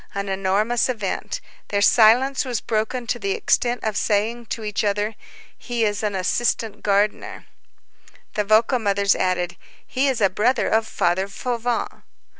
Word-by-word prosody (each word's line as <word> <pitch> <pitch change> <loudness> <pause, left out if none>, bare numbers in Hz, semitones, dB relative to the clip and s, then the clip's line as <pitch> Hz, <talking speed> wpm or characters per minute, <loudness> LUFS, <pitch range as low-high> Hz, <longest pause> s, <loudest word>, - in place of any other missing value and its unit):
An 200 0 -3
enormous 195 +6 +1
event. 220 -6 -3 0.3
Their 200 0 0
silence 245 +6 +5
was 245 -5 -2
broken 225 +3 -2
to 240 +1 -2
the 200 -2 -1
extent 240 0 0
of 220 -2 -1
saying 225 +3 0
to 225 - -4
each 210 0 -2
other: 205 +1 0 0.4
"He 240 -2 -2
is 205 -1 -1
an 210 -2 -1
assistant 210 +3 -1
gardener." 205 +1 0 0.9
The 210 - 0
vocal 220 +5 +3
mothers 200 -2 +2
added: 180 -1 -1 0.3
"He 270 +2 0
is 265 -3 0
a 200 - +5
brother 215 +7 +1
of 220 0 +1
Father 180 +3 0
Fauvent." 240 +3 -3
215 Hz, 150 wpm, -22 LUFS, 200-240 Hz, 0.9 s, silence